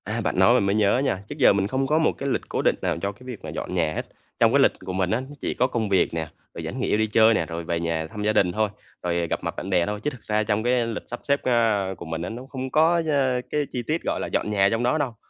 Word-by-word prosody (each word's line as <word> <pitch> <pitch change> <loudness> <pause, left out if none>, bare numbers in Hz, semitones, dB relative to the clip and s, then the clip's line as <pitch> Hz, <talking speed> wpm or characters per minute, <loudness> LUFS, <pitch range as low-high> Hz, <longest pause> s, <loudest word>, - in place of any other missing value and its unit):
À, - - -2
bạn - - -1
nói - - +6
mình - - +3
mới 100 +1 +1
nhớ 105 +1 +3
nha. 95 -7 -1
Trước - - -5
giờ 125 - +6
mình 100 0 +1
không 135 +4 -1
có 155 +3 +3
một 160 - +3
cái 140 - -3
lịch - - 0
cố - - -1
định - - +3
nào 90 -2 0
cho 100 - -1
cái 100 - -21
việc 125 -4 -8
mà - - -6
dọn - - -5
nhà 80 -3 +1
hết. - - -2 0.4
Trong 115 0 +4
cái 140 - +5
lịch 135 - +5
của 95 - -4
mình 95 -1 0
á, 110 - +2
nó 135 +3 -9
chỉ - - -2
có 125 - +2
công 115 -5 -2
việc 95 -4 +2
nè, 80 -1 -2 0.3
rồi - - -6
vẫn - - -5
nghỉ - - +1
đi 110 0 +1
chơi 110 +1 +5
nè, 80 - +1
rồi 85 0 -5
về 85 0 -2
nhà 85 -1 -2
thăm 105 +5 -6
gia 105 +1 +2
đình 90 -4 +3
thôi, 110 +2 0 0.3
rồi 85 -1 0
gặp - - -2
mặt - - -3
bạn 95 - -5
bè 90 -3 +3
thôi. 105 +2 -3
Chứ 150 - +1
thực 125 -6 -12
ra 105 0 0
trong 105 0 0
cái 120 -1 +2
lịch 115 -2 -4
sắp 120 - -6
xếp, 140 0 +1
a, 110 -6 +2
của 85 - -8
mình 80 0 -4
á 90 - -3
nó 120 +3 -7
không 130 -1 -4
có, 165 +2 +4
ơ, 130 -4 +1
cái 150 - 0
chi 125 - -3
tiết, 160 +2 0
gọi - - -1
là, - - -3
dọn 105 - -1
nhà 100 -1 +4
trong 115 +1 0
đó 125 +6 +2
đâu, 135 -6 -2
110 Hz, 320 wpm, -24 LUFS, 95-130 Hz, 0.4 s, nói